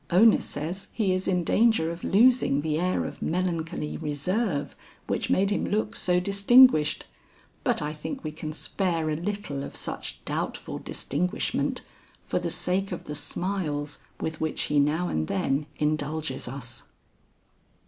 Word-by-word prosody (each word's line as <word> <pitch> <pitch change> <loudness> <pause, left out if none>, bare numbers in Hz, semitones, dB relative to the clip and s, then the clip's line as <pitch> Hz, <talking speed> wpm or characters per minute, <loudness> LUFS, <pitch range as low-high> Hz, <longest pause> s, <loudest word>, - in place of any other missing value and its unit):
Ona 215 +6 +6
says 165 +7 -4
he 200 -5 +1
is 185 0 -1
in 180 -2 +2
danger 220 -4 +3
of 170 0 -8
losing 230 - +4
the 155 0 0
air 180 +1 +1
of - - -7
melancholy 165 -3 -2
reserve 155 +2 -1 0.3
which - - -2
made 195 +2 +3
him - - 0
look 215 +1 -1
so 180 -5 +2
distinguished, 200 - +5 0.6
but - - +2
I 150 +1 -2
think 210 - -6
we 155 - -3
can 155 0 -6
spare 165 -1 -1
a - - 0
little 175 -5 -3
of - - -7
such - - -5
doubtful - - -3
distinguishment 175 +6 -1 0.4
for - - -1
the - - -2
sake 195 +2 -1
of 180 - -4
the 150 - -6
smiles 150 -2 -2 0.2
with 160 0 -4
which 160 - -1
he 150 -1 +2
now 155 +5 +2
and 80 - -1
then 135 +9 0
indulges 150 -2 -1
us." 120 -1 -7
165 Hz, 150 wpm, -27 LUFS, 150-195 Hz, 0.6 s, Ona